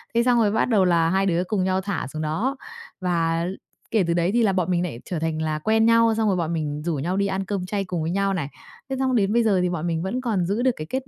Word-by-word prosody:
thế 235 Hz, -, +4 dB
xong 245 Hz, -1 st, +3 dB
rồi 210 Hz, -3 st, +3 dB
bắt 220 Hz, -, +2 dB
đầu 210 Hz, -6 st, +3 dB
là 170 Hz, -2 st, +3 dB
hai 190 Hz, +2 st, +1 dB
đứa 175 Hz, -2 st, +1 dB
cùng 190 Hz, 0 st, -1 dB
nhau 185 Hz, 0 st, +1 dB
thả 195 Hz, -7 st, -3 dB
xuống 155 Hz, +3 st, -6 dB
đó. 195 Hz, -, -1 dB, 0.5 s
Và 165 Hz, -2 st, 0 dB, 0.5 s
kể 220 Hz, -4 st, +3 dB
từ 170 Hz, -, +2 dB
đấy 170 Hz, +2 st, +1 dB
thì 235 Hz, 0 st, +3 dB
là 200 Hz, -3 st, +2 dB
bọn 185 Hz, -1 st, 0 dB
mình 175 Hz, -1 st, +1 dB
lại 150 Hz, -10 st, -5 dB
trở 175 Hz, -, -3 dB
thành 160 Hz, 0 st, -2 dB
là 155 Hz, -1 st, -1 dB
quen 220 Hz, +6 st, +2 dB
nhau, 230 Hz, 0 st, +5 dB
xong 220 Hz, -1 st, +1 dB
rồi 195 Hz, -3 st, +2 dB
bọn 170 Hz, -1 st, -1 dB
mình 150 Hz, -2 st, -3 dB
rủ 170 Hz, -2 st, 0 dB
nhau 170 Hz, +7 st, -2 dB
đi 200 Hz, 0 st, +1 dB
ăn 190 Hz, 0 st, -2 dB
cơm 195 Hz, -2 st, -3 dB
chay 200 Hz, +1 st, -2 dB
cùng 180 Hz, -3 st, -3 dB
với 160 Hz, +1 st, -2 dB
nhau 195 Hz, +1 st, +1 dB
này, 165 Hz, -7 st, -2 dB, 0.4 s
thế 265 Hz, -, -2 dB
xong 260 Hz, -1 st, +1 dB
đến 205 Hz, -2 st, +2 dB
bây 235 Hz, 0 st, +3 dB
giờ 205 Hz, -4 st, +3 dB
thì 180 Hz, -, +1 dB
bọn 175 Hz, -1 st, -3 dB
mình 165 Hz, -1 st, -1 dB
vẫn 205 Hz, +7 st, -2 dB
còn 215 Hz, -8 st, 0 dB
giữ 200 Hz, +6 st, -1 dB
được 260 Hz, +1 st, +3 dB
cái 155 Hz, -, -7 dB
kết 260 Hz, 0 st, -3 dB
185 Hz, 300 wpm, -23 LUFS, 170-220 Hz, 0.5 s, nhau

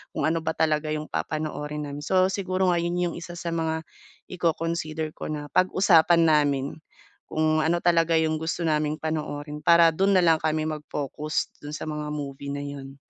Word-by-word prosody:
kung -, -, -1 dB
ano 165 Hz, +1 st, +2 dB
ba 160 Hz, 0 st, -3 dB
talaga 155 Hz, -1 st, +1 dB
'yong 155 Hz, 0 st, -3 dB
papanoorin 150 Hz, -1 st, -3 dB
namin. 145 Hz, 0 st, -6 dB
So, 185 Hz, +5 st, +2 dB
siguro 185 Hz, -1 st, 0 dB
nga 170 Hz, -, +2 dB
'yon 170 Hz, +1 st, -1 dB
'yong 175 Hz, -1 st, -1 dB
isa 175 Hz, 0 st, -8 dB
sa 170 Hz, 0 st, -4 dB
mga 160 Hz, -1 st, -1 dB, 0.5 s
iko-consider 165 Hz, -2 st, -2 dB
ko -, -, -7 dB
na 150 Hz, -1 st, -5 dB
pag-usapan 175 Hz, -3 st, +4 dB
namin, 145 Hz, -4 st, +3 dB, 0.6 s
kung 155 Hz, 0 st, +1 dB
ano 170 Hz, +2 st, +1 dB
talaga 165 Hz, -1 st, +3 dB
'yong 160 Hz, -1 st, +1 dB
gusto 165 Hz, +2 st, -2 dB
naming 155 Hz, -1 st, +1 dB
panoorin 150 Hz, -1 st, -4 dB
para 170 Hz, +1 st, +6 dB
do'n 195 Hz, +4 st, +2 dB
na 185 Hz, -, +5 dB
lang 165 Hz, -2 st, +4 dB
kami 155 Hz, 0 st, 0 dB
mag-focus, 150 Hz, -1 st, -3 dB
do'n 145 Hz, +1 st, -7 dB
sa -, -, -6 dB
mga 150 Hz, -1 st, -4 dB
movie 140 Hz, -1 st, -5 dB
na 145 Hz, -, -4 dB
'yon. 140 Hz, -1 st, -8 dB
155 Hz, 180 wpm, -25 LUFS, 150-170 Hz, 0.6 s, para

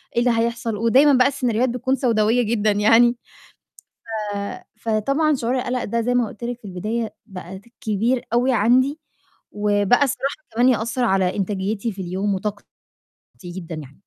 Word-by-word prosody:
إيه -, -, +3 dB
اللي 245 Hz, 0 st, +3 dB
هيحصل 235 Hz, -1 st, -1 dB
ودايمًا 260 Hz, +6 st, +5 dB
بقى 250 Hz, 0 st, +5 dB
السيناريوهات 250 Hz, -3 st, 0 dB
بتكون 250 Hz, +2 st, 0 dB
سَوداويّة 235 Hz, -1 st, +2 dB
جدًا 215 Hz, -1 st, +1 dB
يعني، 230 Hz, +4 st, +4 dB, 1.2 s
ف -, -, -3 dB, 0.4 s
فطبعًا 275 Hz, +8 st, +1 dB
شُعور 250 Hz, 0 st, -1 dB
القَلق 250 Hz, 0 st, -2 dB
ده 230 Hz, +2 st, -1 dB
زي 245 Hz, +2 st, 0 dB
ما 240 Hz, -3 st, +2 dB
قُلت 225 Hz, -, -11 dB
لِك 245 Hz, 0 st, -4 dB
في 215 Hz, -, -16 dB
البداية 215 Hz, +5 st, -4 dB
بقى 190 Hz, -2 st, -9 dB
ت 205 Hz, -, -25 dB, 0.2 s
كبير 225 Hz, +4 st, 0 dB
أوي 250 Hz, +2 st, +3 dB
عندي 255 Hz, +7 st, +3 dB, 0.5 s
وبقى 205 Hz, +4 st, +2 dB
الصراحة 275 Hz, +1 st, -1 dB, 0.2 s
كمان 245 Hz, +2 st, +4 dB
يأثّر 235 Hz, +1 st, 0 dB
على 190 Hz, -4 st, +1 dB
إنتاجيتي 200 Hz, +3 st, -2 dB
في 190 Hz, -, -7 dB
اليوم 190 Hz, +3 st, -1 dB
وطاقتي 205 Hz, +1 st, -4 dB, 0.8 s
جدًا 175 Hz, -2 st, -7 dB
يعني. 145 Hz, -2 st, -10 dB
230 Hz, 160 wpm, -21 LUFS, 205-245 Hz, 1.2 s, ودايمًا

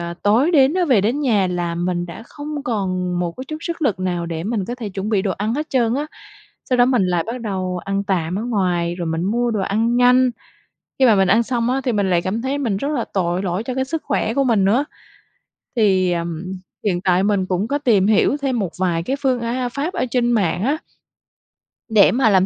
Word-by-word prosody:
ờ, 170 Hz, 0 st, -5 dB
tối 230 Hz, +10 st, +3 dB
đến 285 Hz, -2 st, +4 dB
á, 365 Hz, -1 st, +2 dB
về 255 Hz, -, +4 dB
đến 235 Hz, +9 st, 0 dB
nhà 220 Hz, -9 st, +2 dB
là 175 Hz, -1 st, -2 dB
mình 175 Hz, 0 st, -1 dB
đã 175 Hz, +6 st, -9 dB
không 295 Hz, +1 st, -6 dB
còn 185 Hz, -6 st, -1 dB
một 175 Hz, -1 st, -2 dB
cái 260 Hz, -, -6 dB
chút 310 Hz, -, -4 dB
sức 335 Hz, 0 st, -5 dB
lực 220 Hz, -, +1 dB
nào 175 Hz, -2 st, -2 dB
để 165 Hz, -1 st, -4 dB
mình 215 Hz, -2 st, -1 dB
có 240 Hz, -, -4 dB
thể 240 Hz, -4 st, -6 dB
chuẩn 195 Hz, +1 st, -4 dB
bị 200 Hz, -3 st, +2 dB
đồ 195 Hz, -, -1 dB
ăn 215 Hz, +4 st, -2 dB
hết 300 Hz, +3 st, -4 dB
trơn 240 Hz, -3 st, +2 dB
á. 290 Hz, +3 st, -2 dB, 0.6 s
Sau 250 Hz, -, +2 dB
đó 245 Hz, -, +6 dB
mình 245 Hz, -7 st, +2 dB
lại 175 Hz, -2 st, 0 dB
bắt 245 Hz, +2 st, -4 dB
đầu 185 Hz, -4 st, -3 dB
ăn 195 Hz, 0 st, -1 dB
tạm 180 Hz, -3 st, -1 dB
ở -, -, -3 dB
ngoài, 180 Hz, -7 st, 0 dB
rồi 175 Hz, -2 st, -4 dB
mình 165 Hz, +1 st, -1 dB
mua 240 Hz, +5 st, 0 dB
đồ 215 Hz, -3 st, -1 dB
ăn 225 Hz, +5 st, 0 dB
nhanh, 250 Hz, +1 st, +5 dB, 0.7 s
khi -, -, +6 dB
mà 225 Hz, -, +6 dB
mình 190 Hz, -1 st, +3 dB
ăn 220 Hz, +5 st, +4 dB
xong 235 Hz, 0 st, -1 dB
á, 265 Hz, +1 st, 0 dB
thì 250 Hz, -, +1 dB
mình 200 Hz, -3 st, 0 dB
lại 175 Hz, -1 st, +2 dB
cảm 205 Hz, +6 st, -2 dB
thấy 270 Hz, +2 st, -1 dB
mình 235 Hz, -8 st, -1 dB
rất 275 Hz, +8 st, -2 dB
là 290 Hz, -6 st, -1 dB
tội 180 Hz, -1 st, 0 dB
lỗi 185 Hz, +1 st, -2 dB
cho 255 Hz, -, -4 dB
cái 265 Hz, 0 st, 0 dB
sức 315 Hz, +4 st, -4 dB
khỏe 250 Hz, -5 st, -1 dB
của 275 Hz, -, +2 dB
mình 225 Hz, -6 st, +2 dB
nữa. 230 Hz, +9 st, +3 dB, 0.9 s
Thì, 190 Hz, -5 st, +3 dB
ờm, 170 Hz, 0 st, -3 dB, 0.4 s
hiện 180 Hz, -4 st, 0 dB
tại 185 Hz, 0 st, +2 dB
mình 200 Hz, -2 st, +1 dB
cũng 185 Hz, +3 st, -1 dB
có 285 Hz, -, 0 dB
tìm 225 Hz, -9 st, +3 dB
hiểu 220 Hz, +6 st, +3 dB
thêm 260 Hz, -4 st, 0 dB
một 190 Hz, -5 st, -2 dB
vài 170 Hz, -3 st, 0 dB
cái 265 Hz, -, -1 dB
phương, 260 Hz, -3 st, +1 dB
a 245 Hz, +2 st, -2 dB
pháp 285 Hz, +8 st, -3 dB
ở -, -, -1 dB
trên 240 Hz, -1 st, +2 dB
mạng 195 Hz, -5 st, +1 dB
á 280 Hz, +6 st, +1 dB, 1.1 s
để 215 Hz, -3 st, +6 dB
mà 245 Hz, -2 st, +3 dB
làm 190 Hz, -2 st, +4 dB
210 Hz, 245 wpm, -20 LUFS, 185-250 Hz, 1.1 s, đó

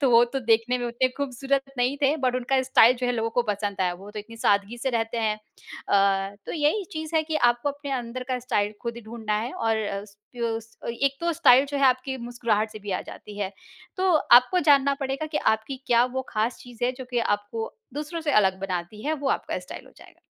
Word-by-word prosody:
तो 270 Hz, -3 st, +3 dB
वो 235 Hz, +1 st, +7 dB
तो 265 Hz, +3 st, -4 dB
देखने 230 Hz, +2 st, +2 dB
में 245 Hz, -, -2 dB
उतने 240 Hz, +2 st, +1 dB
खूबसूरत 275 Hz, 0 st, -1 dB, 0.2 s
नहीं 250 Hz, +3 st, +1 dB
थे 285 Hz, +3 st, +3 dB
बट 255 Hz, -3 st, 0 dB
उनका 260 Hz, +1 st, +1 dB
स्टाइल 255 Hz, -1 st, +5 dB
जो 250 Hz, 0 st, -2 dB
है 245 Hz, -, +1 dB
लोगों 225 Hz, -1 st, -1 dB
को 245 Hz, -, +1 dB
पसंद 200 Hz, -1 st, -4 dB
आया 180 Hz, -1 st, +1 dB
वो 195 Hz, +3 st, -11 dB
तो 210 Hz, -, -7 dB
इतनी 230 Hz, +2 st, -9 dB
सादगी 205 Hz, +2 st, +1 dB
से 265 Hz, +2 st, -1 dB
रहते 230 Hz, 0 st, -1 dB
हैं। 215 Hz, -1 st, +1 dB, 0.5 s
अ, 195 Hz, 0 st, +2 dB
तो -, -, -4 dB
यही 315 Hz, +6 st, +1 dB
चीज़ 315 Hz, +1 st, -5 dB
है 315 Hz, -, +3 dB
कि 310 Hz, 0 st, -2 dB
आपको 240 Hz, +4 st, -2 dB
अपने 285 Hz, 0 st, -6 dB
अंदर 245 Hz, +1 st, -6 dB
का 255 Hz, -1 st, 0 dB
स्टाइल 215 Hz, -4 st, 0 dB
खुद 235 Hz, -1 st, -3 dB
ही -, -, -7 dB
ढूँढना 220 Hz, -1 st, -4 dB
है 240 Hz, +3 st, -4 dB
और 220 Hz, -2 st, 0 dB, 0.5 s
स 230 Hz, -1 st, -3 dB, 0.2 s
एक 275 Hz, +3 st, 0 dB
तो 340 Hz, 0 st, +1 dB
स्टाइल 270 Hz, -4 st, +6 dB
जो 285 Hz, 0 st, -4 dB
है 275 Hz, -, +2 dB
आपकी 260 Hz, +1 st, +2 dB
मुस्कुराहट 235 Hz, -3 st, -1 dB
से 215 Hz, -, -9 dB
भी 205 Hz, -1 st, -7 dB
आ -, -, -1 dB
जाती 205 Hz, -1 st, -10 dB
है। 200 Hz, -1 st, -2 dB, 0.4 s
तो 375 Hz, 0 st, +2 dB
आपको 255 Hz, +6 st, +5 dB
जानना 280 Hz, 0 st, +5 dB
पड़ेगा 275 Hz, +3 st, -2 dB
कि -, -, +1 dB
आपकी 220 Hz, +5 st, -3 dB
क्या 240 Hz, 0 st, +5 dB
वो 260 Hz, -, 0 dB
ख़ास 220 Hz, +2 st, -1 dB
चीज़ 245 Hz, -1 st, -6 dB
है 250 Hz, -, +1 dB
जो 260 Hz, -, -6 dB
कि 245 Hz, -, 0 dB
आपको 205 Hz, 0 st, -2 dB, 0.2 s
दूसरों 305 Hz, +3 st, -4 dB
से 310 Hz, -2 st, -1 dB
अलग 190 Hz, -1 st, +1 dB
बनाती 190 Hz, +2 st, -4 dB
है 310 Hz, -, +1 dB
वो 280 Hz, -2 st, -2 dB
आपका -, -, -1 dB
स्टाइल -, -, -9 dB
हो -, -, -17 dB
जाएगा। -, -, -17 dB
240 Hz, 230 wpm, -25 LUFS, 220-270 Hz, 0.5 s, वो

